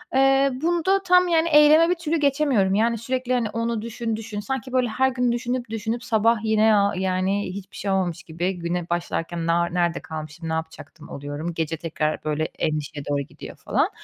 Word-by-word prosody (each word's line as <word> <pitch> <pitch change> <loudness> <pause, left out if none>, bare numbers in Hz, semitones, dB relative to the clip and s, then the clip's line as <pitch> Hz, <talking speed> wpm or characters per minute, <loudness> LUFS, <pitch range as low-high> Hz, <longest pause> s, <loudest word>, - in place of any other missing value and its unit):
Eee, 270 +1 +4
bunda 345 +4 +1
tam, 360 -1 +5
yani, 335 -1 +2
eyleme 305 +2 +6
bir 360 - +2
türlü 335 -1 -1
geçemiyorum, 275 -9 +2
yani, 230 +2 +2
sürekli, 255 +2 -2
hani, 240 -3 0
onu 230 0 -2
düşün, 230 0 -3
düşün. 220 -1 -6
Sanki, 260 +4 -4
böyle, 255 -1 +2
her 265 +4 +2
gün 250 -1 0
düşünüp 240 0 -2
düşünüp 225 +2 -3
sabah 230 0 +2
yine, 220 0 +4
aaa, 200 0 +3
yani, 190 +2 0
hiçbir 195 0 -9
şey 200 - -2
olmamış 180 -3 -1
gibi 175 +3 -3
güne 170 0 -3
başlarken, 170 -1 -2
"Na 170 +1 +3
nerede 175 -1 0
kalmışım, 160 +1 -7
ne - - -1
yapacaktım?" 160 -1 -7
oluyorum. 145 +4 -5
Gece 165 0 -2
tekrar, 155 -1 -2
böyle, 155 0 -1
endişeye 150 -2 -3
doğru 145 -1 +1
gidiyor 140 - -10
falan. - - 0
215 Hz, 185 wpm, -23 LUFS, 170-255 Hz, -, eyleme